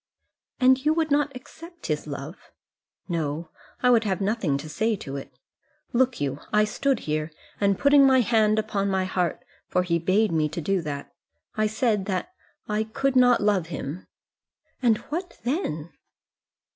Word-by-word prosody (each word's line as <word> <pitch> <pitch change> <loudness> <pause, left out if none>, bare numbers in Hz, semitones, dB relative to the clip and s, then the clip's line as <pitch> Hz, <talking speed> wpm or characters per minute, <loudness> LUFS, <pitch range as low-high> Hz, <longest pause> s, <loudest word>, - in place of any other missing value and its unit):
"And 260 0 +4
you 305 +1 +3
would 320 -2 0
not 290 0 +2
accept 330 +6 -12
his 150 -2 -2
love?" 140 +4 -8 0.6
"No; 160 -2 -3 0.3
I 250 - +6
would 230 -2 +5
have 195 -3 -1
nothing 195 -8 0
to 145 +3 -7
say 220 +8 0
to 140 -8 -7
it. 140 - -8 0.6
Look 255 +1 +2
you, 140 -1 -2
I 210 0 +4
stood 260 +4 0
here, 155 0 -2 0.3
and 200 -2 +2
putting 280 -1 +6
my 260 -1 +5
hand 215 -2 +3
upon 205 -2 0
my 190 -1 +1
heart, 180 -2 -1 0.2
for 180 - +1
he 170 -2 0
bade 190 +5 +2
me 155 -2 +1
to 155 - -5
do 185 +3 0
that, 145 -3 -6 0.4
I 215 0 +2
said 215 -2 0
that 195 - -3 0.3
I 215 +1 0
could 265 +5 -1
not 245 -1 +5
love 200 -5 +2
him." 155 +1 -6 0.7
"And 230 -4 +4 0.2
what 355 +3 -4
then?" 195 - -2
210 Hz, 165 wpm, -25 LUFS, 165-250 Hz, 0.7 s, I